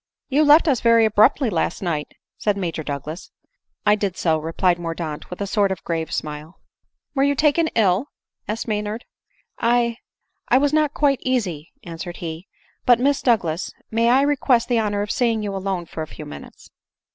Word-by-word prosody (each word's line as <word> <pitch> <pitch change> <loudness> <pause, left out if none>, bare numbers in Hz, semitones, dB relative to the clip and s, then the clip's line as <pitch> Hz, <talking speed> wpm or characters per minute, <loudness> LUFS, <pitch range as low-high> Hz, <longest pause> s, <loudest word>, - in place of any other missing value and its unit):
"You 290 +3 +3
left 300 +3 +6
us 270 -6 +2
very 230 -1 +5
abruptly 220 +4 +3
last 170 +1 -1
night," 155 -5 -3 0.2
said 205 -2 0
Major 170 -4 -3
Douglas. 150 +3 -6 0.3
" - - -53
I 210 - +6
did 200 -3 -1
so," 160 -2 +1
replied 175 +3 0
Mordaunt 165 -3 -5
with 180 - -7
a - - 0
sort 200 0 +1
of 180 -3 -4
grave 165 -1 -3
smile. 150 +2 -5 0.3
" - - -56
Were 270 - 0
you 285 +1 +3
taken 310 +3 +3
ill 210 +3 +2 0.2
?" - - -55
asked 220 +3 -3
Maynard. 210 +1 -3 0.3
" - - -34
I 235 0 +2 0.3
— - - -52
I 250 - +5
was 285 +2 +2
not 305 -1 +2
quite 280 -3 +2
easy," 190 - -2
answered 175 +1 -7
he; 165 +2 -6 0.2
" - - -38
but, 245 -2 +6
Miss 280 +2 +2
Douglas, 185 -9 0 0.2
may 230 +1 +2
I 260 +3 +5
request 270 -4 +2
the 240 -2 +3
honor 205 -2 0
of 210 - -4
seeing 230 -3 +1
you 200 -1 -3
alone 190 -2 -3
for 160 - -7
a 155 - -4
few - - -10
minutes 75 -1 -12
210 Hz, 200 wpm, -22 LUFS, 170-245 Hz, 0.3 s, left